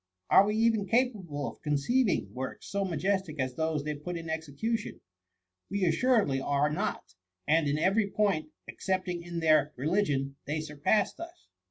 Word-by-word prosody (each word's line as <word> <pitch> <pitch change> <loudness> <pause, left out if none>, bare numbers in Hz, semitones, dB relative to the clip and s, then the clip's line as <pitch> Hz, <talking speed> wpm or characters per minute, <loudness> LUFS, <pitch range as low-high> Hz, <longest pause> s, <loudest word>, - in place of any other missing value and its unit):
Are 200 - +7
we 210 - 0
even 220 -2 +2
capable 200 - 0
of - - -9
conceiving 170 - +1
works 130 +1 -6
so 200 0 -1
majestic 185 -2 -1
as 130 -1 -1
those 160 +1 -1
they 150 0 -2
put 170 +4 -5
in 165 -1 -5
execution? 160 +9 -3 0.7
We 200 -1 -1
assuredly 170 - +2
are 145 +2 +1
not; 95 -10 -3 0.3
and 155 0 +3
in 145 +1 +1
every 200 +5 +2
point, 195 -8 0 0.2
excepting 185 -2 -2
in 170 -1 -5
their 155 -2 +4
re 130 - -5
ligion, 140 -7 0
they 150 +2 -1
surpassed 155 +7 0
us." 340 +1 -10
165 Hz, 160 wpm, -29 LUFS, 150-200 Hz, 0.7 s, Are